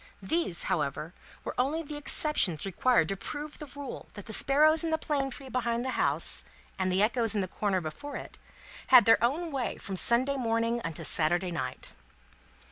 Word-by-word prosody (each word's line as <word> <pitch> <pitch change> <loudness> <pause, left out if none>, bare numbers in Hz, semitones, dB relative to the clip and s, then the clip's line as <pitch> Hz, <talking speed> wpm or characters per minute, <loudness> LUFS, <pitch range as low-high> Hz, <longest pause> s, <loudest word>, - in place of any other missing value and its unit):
These, 190 - 0
however, 150 +2 -2 0.3
were - - -5
only 295 +6 0
the 300 -1 -8
exceptions 290 - +2
required 195 -1 +2
to 195 - -1
prove 295 +8 -6
the 300 - -8
rule 280 -1 -9
that 205 - -9
the 220 - -7
sparrows 305 +6 +4
in 330 - -1
the 320 - +1
plane 285 -3 -2
tree 270 +1 -6
behind 240 -1 -2
the 260 - -2
house, - - +2 0.4
and 185 0 0
the 190 +2 +2
echoes 225 0 +1
in 205 - +1
the 185 - -3
corner 190 0 -1
before 285 - -7
it, - - -9 0.5
had - - +7
their 225 0 +4
own 315 +8 0
way 265 -3 -3
from 195 - -6
Sunday 255 +8 +4
morning 230 -1 -1
unto 165 -2 -4
Saturday 175 +3 +1
night. 130 -6 -4
235 Hz, 185 wpm, -28 LUFS, 190-285 Hz, 0.5 s, had